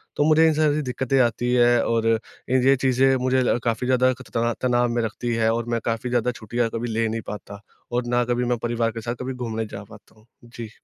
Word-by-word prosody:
तो 145 - +2
मुझे 160 +1 +5
इस 155 - -1
तरह 155 -2 +3
से 150 - 0
दिक्कतें 130 0 -1
आती 120 +1 0
हैं 120 -1 +4
और 115 -1 0 0.4
ये 130 +1 +4
चीज़ें 135 0 +2
मुझे 130 0 +2 0.2
काफ़ी 120 +1 -1
ज़्यादा 130 0 +3
एक 130 0 -3
त 115 0 +1
तनाव 120 -1 +2
में 120 0 0
रखती 120 +2 -3
है 115 0 +2
और 120 0 -2
मैं 115 -1 0
काफ़ी 115 +2 -2
ज़्यादा 125 0 +1
छुट्टियाँ 120 +1 -2
कभी 120 +1 -3
ले 115 0 0
नहीं 115 +1 -3
पाता 100 -1 -8 0.3
और 120 0 -1
ना 120 0 +2
कभी 120 +1 0
मैं 120 0 0
परिवार 115 -1 0
के 115 0 -7
साथ 120 +2 -4
कभी 130 +1 -4
घूमने 115 -3 -4
जा 100 -1 -8
पाता 105 0 -16
हूँ, 110 - -24 0.2
जी। 120 -1 -9
120 Hz, 235 wpm, -23 LUFS, 115-125 Hz, 0.4 s, मुझे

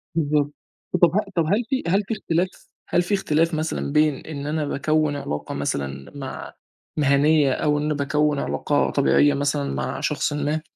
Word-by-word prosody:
بالضبط 150 -2 +1 0.5
طب 175 0 +5
ه - - +5 0.2
طب 165 -2 +2
هل 205 +9 +1
في 265 - 0
هل 195 +4 +3
في - - -1
اختلاف، 180 -4 0 0.4
هل 175 - +3
في 175 +3 -2
اختلاف 165 -3 +1
مثلًا 155 -2 -2
بين 150 -1 +3
إن 145 -3 -6
أنا 155 0 -1
باكوّن 155 +1 0
علاقة 75 - -4
مثلًا 70 -1 -3
مع 135 -1 -7 0.4
مهنيّة، 145 0 +4
أو 150 +2 +1
إن 150 +1 0
باكوّن 150 0 +1
علاقة 145 - 0
طبيعية 145 +1 +3
مثلًا 140 0 -1
مع - - -3
شخصٍ 150 +1 -1
ما؟ 150 +2 -1
150 Hz, 165 wpm, -23 LUFS, 145-160 Hz, 0.5 s, طب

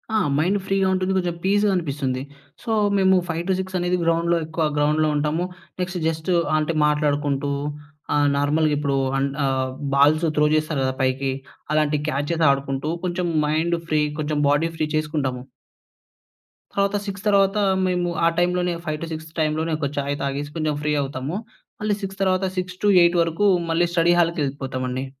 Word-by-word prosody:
ఆ! - - +4 0.2
మైండు 185 +6 +2
ఫ్రీగా 195 -1 +1
ఉంటుంది. 185 0 0
కొంచం 175 -2 -1
పీస్‌గా 205 +2 +3
అనిపిస్తుంది. 140 -6 -2 0.4
సో, 235 - -7 0.3
మేము 190 -1 +4
5:00-6:00 185 +3 -2
అనేది 180 +1 +1
గ్రౌండ్‌లో 170 +1 +2
ఎక్కువ 160 +1 -2
గ్రౌండ్‌లో 150 +1 +2
ఉంటాము. 150 +3 0 0.4
నెక్స్ట్ 180 0 -3
జస్ట్ 160 +2 -2 0.3
అంటే, 155 +2 0
మాట్లాడుకుంటూ, 145 -1 0 0.6
ఆహ్, 145 0 +3
నార్మల్‌గిప్పుడూ 145 -1 +1 0.2
అంద్ 135 0 -1
ఆహ్, 130 -1 0 0.3
బాల్సు 155 +4 +4
త్రో 150 - +4
చేస్తారు 155 -2 0
కదా 130 0 -1
పైకి, 130 +1 0 0.4
అలాంటి 150 -1 +2
క్యాచెస్ 155 +3 0
ఆడుకుంటూ, 140 +2 -2
కొంచం 175 0 -1 0.2
మైండ్ 160 +3 +1
ఫ్రీ, 155 -1 +2 0.2
కొంచెం 150 0 -1
బాడీ 150 +3 +2
ఫ్రీ 155 - 0
చేసుకుంటాము. 150 -5 -1 1.3
తరవాత 200 0 +1
6 200 -1 -6
తర్వాతా, 200 0 +3 0.2
మేము 180 -1 0 0.2
ఆ - - +6
టైమ్‌లోనే 180 0 +1
5-6 160 0 -5
టైమ్‌లోనే 155 +1 0
ఒక 145 -2 -1
చాయ్ 140 0 -1
తాగేసి 140 +1 -3
కొంచెం 155 -2 0
ఫ్రీ 150 0 0
అవుతాము. 140 +5 -4 0.4
మళ్ళీ 210 -1 +1
6 195 0 -6
తర్వాత 190 0 +2
6-8 180 -1 +3
వరకు 165 +5 -1 0.2
మళ్ళీ 170 +1 +2
స్టడీ 170 0 +4
హాల్‌కెళ్ళిపోతామండి. 135 -5 -1
155 Hz, 145 wpm, -23 LUFS, 145-180 Hz, 1.3 s, ఆ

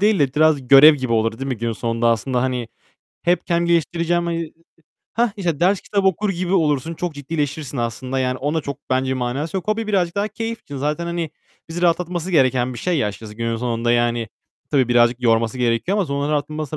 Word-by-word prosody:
değil 210 0 +3
de 135 -3 +1
biraz 150 -4 +3
görev 140 +4 +9
gibi 130 -4 -3
olur, 115 0 +1
değil 135 +1 -4
mi 130 - -2
günün 115 +1 -2
sonunda 115 +1 0
aslında, 120 +2 0
hani, 125 -3 -2 0.6
hep 175 0 +1
kendim, 170 0 +1
geliştireceğim, 170 +1 +1
hani, 170 -1 -1
ı - - -5
ı - - -16 0.6
Hah! 235 0 +2
İşte, 170 -6 -2
ders 185 +3 +3
kitap 200 -2 -1
okur 190 +2 +2
gibi 180 0 -2
olursun, 155 -3 +1
çok 175 -1 -4
ciddileşirsin 145 -1 -4
aslında. 120 +3 -3
Yani, 130 0 -1
onun 150 +4 -1
da - - -1
çok 140 -1 -5
bence 130 0 +1
manası 130 +7 -3
yok. 190 - -5
Hobi 220 +1 0
birazcık 185 -4 0
daha 205 +1 0
keyif 225 +2 -5
için. 145 - -8
Zaten, 150 +5 -2
hani, 170 -2 -3 0.4
bizi 170 +2 -5
rahatlatması 175 0 0
gereken 130 -5 +2
bir - - -7
şey 175 +5 0
ya, 105 - +1
açıkçası 105 +1 -9
günün 115 +1 -2
sonunda, 120 0 0
yani, 120 -1 +1 0.4
tabii 135 -5 +2
birazcık 120 +1 +3
yorması 115 0 +2
gerekiyor 125 - +1
ama 195 - +1
sonra 140 +1 -1
rahatması 150 0 -3
145 Hz, 210 wpm, -21 LUFS, 125-170 Hz, 0.6 s, görev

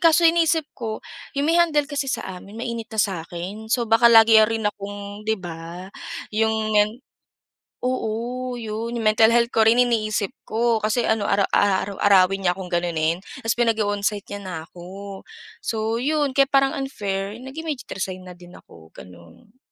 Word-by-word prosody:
kaso 335 0 +5
iniisip 330 -1 +4
ko, 220 -3 -6 0.3
yung 280 - +1
may 335 +3 +4
handle 300 -4 +3
kasi 285 -2 -3
sa - - -2 0.2
amin 205 +3 -13
mainit 230 -1 -4
na 220 - -9
sa 195 -5 +1
akin. 185 +6 -7
So 235 +1 +1
baka 230 +1 +5
lagi 225 -1 +8
rin 225 -1 -2
akong 205 0 -5
'di 220 - +2
ba? 175 +2 -8 0.4
Yung 220 0 +1
men 210 0 +4 0.9
oo, 250 +1 -2
'yun. 225 +1 -4
Yung 230 -2 -3
mental 220 +1 +5
health 235 0 +4
ko 225 - +4
rin 235 +2 +5
iniisip 215 -4 0
ko. 230 0 +1
Kasi 225 +3 +1
ano, 220 -2 +1
ara 200 -1 +3
aaraw-arawin 195 -1 +3
niya 175 - +4
akong 190 -2 -6
ganunin 170 -1 0 0.2
tapos 225 - +1
pinag-o-onsite 210 -3 0
niya 200 - -7
na 185 -2 -6
ako. 195 +3 -10 0.4
So, 220 0 -1
'yon 290 0 0
kaya 275 - +6
parang 275 0 +3
unfair, 205 -6 -3
nag-immediate 280 +1 -6
resign 185 -1 -5
na 180 - -9
din 175 0 -14
ako, 80 -1 -17
gano'n. 90 - -15
220 Hz, 165 wpm, -23 LUFS, 195-240 Hz, 0.9 s, lagi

